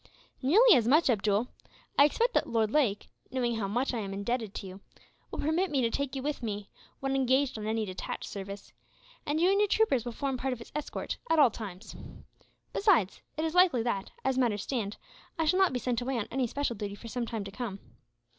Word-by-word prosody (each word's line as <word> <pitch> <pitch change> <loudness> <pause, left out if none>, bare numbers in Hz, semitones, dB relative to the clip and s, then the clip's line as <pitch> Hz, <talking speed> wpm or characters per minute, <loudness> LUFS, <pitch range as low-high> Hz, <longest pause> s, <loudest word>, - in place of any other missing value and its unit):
"Nearly 415 - +7
as 235 -2 +2
much, 295 +1 +5
Abdool. 210 +1 +1 0.5
I 285 - +7
expect 470 +11 +1
that - - +1
Lord 220 -2 +1
Lake, 235 -9 +1 0.2
knowing 240 -3 -1
how 205 -3 -1
much 245 +7 0
I 235 - -1
am 195 -2 -4
indebted 220 +1 -2
to - - -5
you, 190 0 -9 0.5
will - - -6
permit 335 +5 +1
me 285 -3 +1
to 230 -1 +1
take 280 +1 -2
you 265 - -3
with 295 -1 -2
me, 205 -3 -4 0.3
when 270 0 0
engaged 265 +1 +2
on 215 -1 -4
any 220 0 0
detached 185 -2 -5
service; 200 0 -7 0.5
and 295 +2 +1
you 355 +3 +4
and 395 - +3
your 420 - +4
troopers 390 - +2
will 240 - -4
form 270 +2 -2
part 260 +1 -1
of - - -6
his 230 - -11
escort, 300 -1 -4
at 325 - +3
all 285 -6 +6
times. 205 -2 -8 0.8
Besides, 360 - +3 0.2
it 315 - 0
is 320 - -2
likely 355 -10 +5
that, 200 -5 -2 0.2
as 265 -1 +1
matters 215 -5 +1
stand, 220 -6 -3 0.4
I 325 - +1
shall 365 +5 +3
not 380 -2 +5
be 255 - -1
sent 245 -1 -1
away 260 +1 -1
on 215 - -2
any 260 -1 0
special 280 0 -2
duty 200 -1 -5
for 230 - -11
some 240 0 -3
time 225 -3 -3
to 195 - -8
come. 205 -2 -5
245 Hz, 220 wpm, -30 LUFS, 215-285 Hz, 0.8 s, Nearly